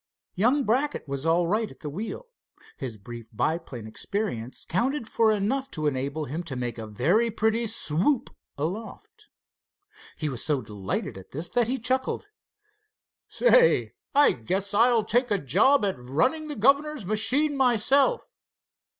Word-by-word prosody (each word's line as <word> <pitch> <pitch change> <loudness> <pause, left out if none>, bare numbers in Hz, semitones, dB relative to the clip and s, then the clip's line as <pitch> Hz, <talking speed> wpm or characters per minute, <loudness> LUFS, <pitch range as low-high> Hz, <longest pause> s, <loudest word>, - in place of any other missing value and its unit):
Young 245 +9 +2
Brackett 260 - 0
was 140 +2 -3
all 170 +2 +3
right 215 +5 0
at - - -16
the 150 - -5
wheel. 215 - -6 0.5
His 115 -4 -6
brief 115 +2 -10
biplane 130 -1 -3
experience 125 - -4
counted 245 - -1
for 225 0 +3
enough 240 +7 -1
to 155 - -2
enable 140 +2 -1
him 155 +5 -4
to 140 -5 -5
make 120 -2 -4
a 110 - -6
very 170 - +2
pretty 225 +1 0
swoop 220 - 0 0.3
aloft. 220 - -6 0.9
He 155 - -2
was 125 -5 -2
so 145 -5 0
delighted 100 -2 -4
at 95 - -15
this 160 +5 -5
that 240 -2 +1
he 260 +2 0
chuckled: 260 - -1 1.0
"Say, - - +4 0.2
I 290 0 +6
guess 190 - -3
I'll 230 +1 +4
take 245 +2 +1
a 205 - +2
job 210 - +3
at 190 -10 -2
running 165 - 0
the 295 - -5
governor's 280 +2 +2
machine 235 +9 +2
myself. 270 - +3
205 Hz, 150 wpm, -26 LUFS, -, 1.0 s, I